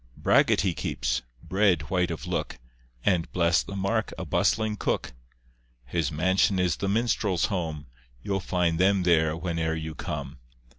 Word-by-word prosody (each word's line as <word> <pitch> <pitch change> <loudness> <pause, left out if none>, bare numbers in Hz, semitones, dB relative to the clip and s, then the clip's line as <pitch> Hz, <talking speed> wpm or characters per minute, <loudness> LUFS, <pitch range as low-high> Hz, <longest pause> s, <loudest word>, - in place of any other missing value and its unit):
Bragget - - +4
he 95 -2 +1
keeps, - - -2 0.2
bread 95 -7 +1
white 90 -1 +1
of 80 -2 -5
look, 85 -4 -3 0.5
And, 90 -5 +1
bless 85 -1 +3
the 100 - -7
mark, 105 +3 -1
a 95 - -5
bustling 110 +6 +1
cook. 100 - -2 0.7
His 80 +3 -1
mansion 95 +5 +2
is 90 -2 +1
the 100 - -2
minstrels' 105 -4 +1
home, 80 -5 -3 0.4
You'll 95 -1 -1
find 90 -2 0
them 95 0 +3
there 80 -3 +3
whene'er 80 -1 -2
you 80 0 -5
come. 75 - -6
90 Hz, 150 wpm, -27 LUFS, 80-95 Hz, 0.7 s, Bragget